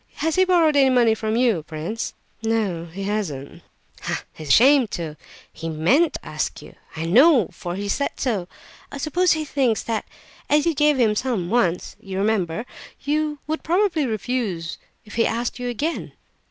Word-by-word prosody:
Has 320 +1 -1
he 375 +3 +4
borrowed 335 -5 +4
any 275 -2 +5
money 240 -3 +4
from 220 0 -2
you, 235 -8 +2
prince?" 160 +8 -5 0.3
"No, 215 -7 -1
he 175 +4 -7
has 205 -2 -1
not." 140 -1 -9 0.5
"Ah, - - -2
he's 155 - -9
ashamed 255 - +6
to! 160 -3 -5 0.4
He 165 - -5
meant 210 - +3
to - - -7
ask - - -3
you, - - -13 0.2
I 160 0 -3
know, 245 - +5
for 175 0 -6
he 200 +1 -4
said 280 +8 0
so. 210 -9 -1 0.4
I - - -6
suppose 340 +5 +2
he 315 -1 -2
thinks 260 -6 +1
that 225 -2 -2 0.4
as 295 0 +3
you 335 - +2
gave 295 -1 +3
him 220 -3 +4
some 210 -7 -1
once 185 -8 0
(you 190 -1 -6
remember), 200 0 0 0.4
you 300 +1 0
would 315 +1 -3
probably 340 -4 +1
refuse 215 -6 -3 0.3
if 210 - -13
he 230 - +4
asked 235 +2 -2
you 245 0 -3
again." 290 +8 -3
230 Hz, 180 wpm, -23 LUFS, 185-290 Hz, 0.5 s, ashamed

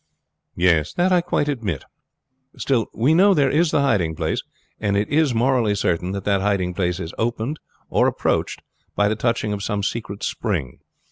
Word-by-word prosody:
"That 90 - +2
I 180 -1 +4
quite 150 -3 -1
admit. 110 - -3 0.7
Still 125 -5 0
we 130 +7 +2
know 195 +3 +5
there 140 -4 +3
is 160 +3 +3
the 145 - +2
hiding 95 -12 +1
place, 80 0 -1 0.4
and 100 -2 0
it 105 - 0
is 145 -4 +2
morally 120 -3 +2
certain 90 -2 -1
that 100 -1 -4
that 100 -2 +2
hiding 95 -3 0
place 90 -1 -1
is 80 - -6
opened 120 +5 -2 0.3
or - - +2
approached - - -1 0.3
by 105 - +3
the 110 - 0
touching 110 -2 -1
of 100 - -4
some 100 0 -2
secret 105 -1 -4
spring. 85 - -3
105 Hz, 175 wpm, -22 LUFS, 95-135 Hz, 0.7 s, know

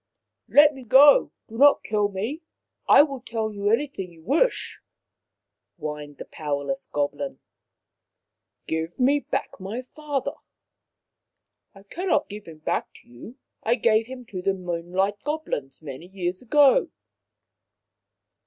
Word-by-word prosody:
" - - -59
Let 295 +1 +7
me 265 -2 -11
go. 275 +5 +6 0.2
Do 225 +1 -9
not 285 +1 +6
kill 210 -1 0
me. 220 - -4 0.5
I - - +9
will 275 -3 -4
tell 225 -3 -3
you 205 0 -1
anything 225 -6 -1
you 165 -1 -18
wish," 325 - 0 1.0
whined 150 -2 -6
the - - -8
powerless 140 -3 -4
goblin. 145 - -2 0.7
" - - -59
Give 160 +4 -3
me 275 +3 +4
back 270 -1 -3
my 210 +7 -5
father." 290 0 -4 0.7
" - - -54
I 195 - -15
cannot 330 - -1
give 210 -1 -9
him 160 -2 -11
back 155 - -2
to - - -27
you. 120 - -12 0.3
I 230 +2 +2
gave 225 -1 +2
him 255 -1 -9
to 185 -2 -4
the 195 +1 0
Moonlight 185 +3 -2
Goblins 220 - -4
many 145 +3 -8
years 180 -1 -4
ago." 285 - +4
210 Hz, 140 wpm, -24 LUFS, 175-270 Hz, 1.0 s, I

